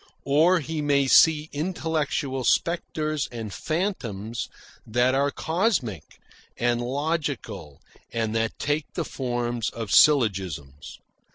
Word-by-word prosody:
Or 165 +6 +4
he 155 +1 -3
may 140 -1 +2
see 155 +3 +5
intellectual 150 -4 -2
spectres 155 -1 0
and 110 -4 -6
phantoms 120 - -3 0.3
that 125 +3 +2
are 140 +1 +2
cosmic 160 - -1 0.4
and 120 0 +1
logical 130 - -3 0.3
and 110 -1 -1
that 115 0 -1
take 145 +1 -2
the - - -1
forms 120 -3 -2
of 115 -4 -6
syllogisms. 95 - +2
135 Hz, 105 wpm, -25 LUFS, 115-155 Hz, 0.4 s, see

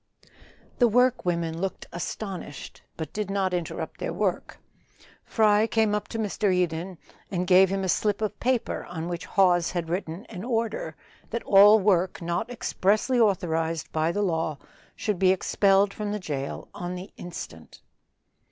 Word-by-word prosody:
The 245 - +6
work 250 +1 +3
women 170 -2 -1
looked 195 -1 -3
astonished, 175 -3 -6 0.2
but 160 -2 -6
did 210 -2 -3
not 195 -2 0
interrupt 170 -2 -4
their - - -3
work. 185 +1 -2 0.7
Fry 215 -1 +3
came 220 -2 +2
up 210 - -1
to 230 - -5
Mr. 210 -2 0
Eden 180 0 -1 0.3
and 180 -1 -1
gave 185 0 +6
him 195 0 -1
a - - -1
slip 205 +2 +1
of 210 -1 -3
paper 250 -1 0
on 165 -1 -5
which 175 -1 -5
Hawes 175 -3 +3
had 170 -2 -3
written 175 +2 -4
an 190 -4 -8
order 225 -9 -2 0.3
that 235 +1 -3
all 205 +2 +7
work 185 -3 +2
not 175 +7 -2
expressly 235 +1 +1
authorized 165 -6 0
by 160 +1 +1
the 205 +4 -1
law 160 -5 -1 0.4
should 210 -4 -2
be 190 - +4
expelled 195 +1 +3
from 210 -1 -4
the 210 - -2
jail 140 -6 -5
on 180 +1 -5
the 180 +2 -8
instant. 80 - -9
190 Hz, 160 wpm, -26 LUFS, 170-210 Hz, 0.7 s, all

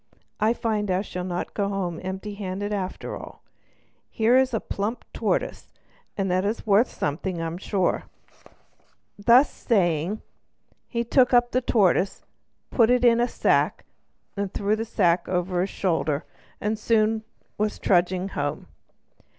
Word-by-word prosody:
I 220 +2 +3
find 215 -3 -1
I 185 +1 +1
shall 180 -3 -5
not 180 -1 -4
go 200 -1 -1
home 185 -4 -3
empty 190 +3 -5
handed 200 +1 -4
after 190 -2 -4
all; - - -11 0.7
here 230 +2 +3
is 260 0 +4
a 225 - 0
plump 210 +5 -4
tortoise, - - -2 0.5
and 195 -2 0
that 185 +1 +2
is 210 +3 -2
worth 215 +3 +4
something, 170 +5 -3
I'm 165 +1 -3
sure." 195 -2 0 1.1
Thus 240 +7 +5
saying, 180 -2 0 0.6
he 235 -1 -1
took 250 +1 +4
up 240 0 +4
the 255 - +1
tortoise, 200 -5 +2 0.5
put 230 -2 +4
it 250 0 +3
in 235 -1 +5
a 240 - +2
sack, - - +1 0.7
threw 205 +1 +1
the 225 +1 -3
sack 180 -6 +1
over 180 0 0
his 190 - -1
shoulder, 160 -7 -1 0.3
and 210 - -1
was 220 - -4
soon 220 -1 +2 0.6
trudging 180 +1 +2
home. 145 -5 -3
200 Hz, 140 wpm, -25 LUFS, 180-225 Hz, 1.1 s, Thus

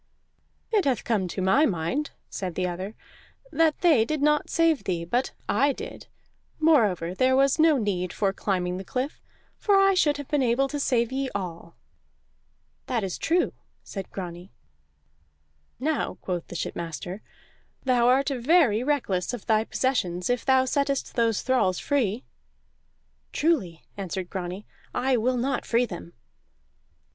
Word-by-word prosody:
"It 420 -5 +2
hath 265 -4 +1
come 210 -6 0
to 185 +2 -4
my 275 +12 +4
mind," 195 - -1 0.2
said 180 -4 -5
the 180 -1 0
other, 185 +4 -5 0.6
"that 320 -2 +2
they 315 -10 +5
did 305 +6 -2
not 300 +1 +2
save 330 -3 +2
thee, 170 -3 -1
but 245 +10 -1
I 275 +7 +3
did. 460 - -9 0.5
Moreover, 215 - +3
there 255 +6 +3
was 275 +2 +3
no 315 -2 +5
need 185 -6 -1
for 195 -2 0
climbing 180 -3 -1
the 190 - -6
cliff, 255 +8 -4 0.4
for 410 - +3
I 390 0 +5
should 300 -6 +2
have 285 -2 -7
been 295 -2 +1
able 255 +2 +2
to 290 - -3
save 240 -3 +1
ye 270 0 -1
all." 170 -3 -5 1.1
"That 235 -4 0
is 190 -2 -4
true," 345 +2 +1 0.3
said 195 -2 -7
Grani. 180 0 -7 1.3
"Now," 300 +3 -1
quoth 175 -2 -3
the - - -9
shipmaster, 170 +4 -5 0.6
"thou 245 -2 +3
art 270 +3 +3
very 255 -3 +3
reckless 245 -7 0
of 235 - -11
thy 220 -1 +3
possessions 185 -9 0
if 245 - -1
thou 265 -1 +4
settest 280 0 -1
those 230 -3 +1
thralls 250 -9 +2
free." 250 -5 0 1.1
"Truly," 250 - 0
answered 190 -2 -5
Grani, 185 +2 -5 0.3
"I 260 +1 +2
will 250 +3 +1
not 265 +2 -1
free 240 +1 +2
them." 175 -4 -9
240 Hz, 150 wpm, -26 LUFS, 185-280 Hz, 1.3 s, they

